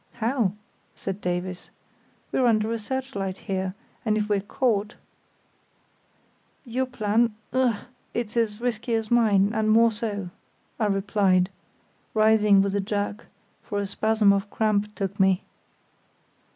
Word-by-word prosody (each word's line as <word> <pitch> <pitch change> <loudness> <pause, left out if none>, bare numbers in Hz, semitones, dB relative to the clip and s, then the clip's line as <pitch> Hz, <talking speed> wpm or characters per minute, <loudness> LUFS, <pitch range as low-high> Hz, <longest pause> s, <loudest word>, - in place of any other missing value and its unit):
"How?" 230 -4 0 0.4
said 195 +1 -5
Davies. 180 0 -3 0.6
"We're 255 - +2
under 220 -1 +2
a 230 - -1
searchlight 215 -5 -3
here; 190 -1 -3 0.3
and 215 -2 +1
if 210 0 -1
we're 205 -1 +2
caught——" 210 0 0 1.7
"Your 255 +2 -1
plan—ugh!—it's 235 +1 -1
as 225 -2 0
risky 235 -1 -1
as 225 0 -2
mine, 210 -4 +4
and 215 -1 +1
more 230 +1 +5
so," 205 -4 -4 0.5
I 215 - +2
replied, 195 -2 +2 0.6
rising 215 -2 +5
with 200 0 -1
a 200 - +1
jerk, 205 +2 -3 0.3
for 205 -4 -5
a 200 - 0
spasm 215 0 +3
of 200 +1 -1
cramp 210 -1 0
took 195 +1 -3
me. 190 -1 +3
210 Hz, 125 wpm, -25 LUFS, 200-230 Hz, 1.7 s, more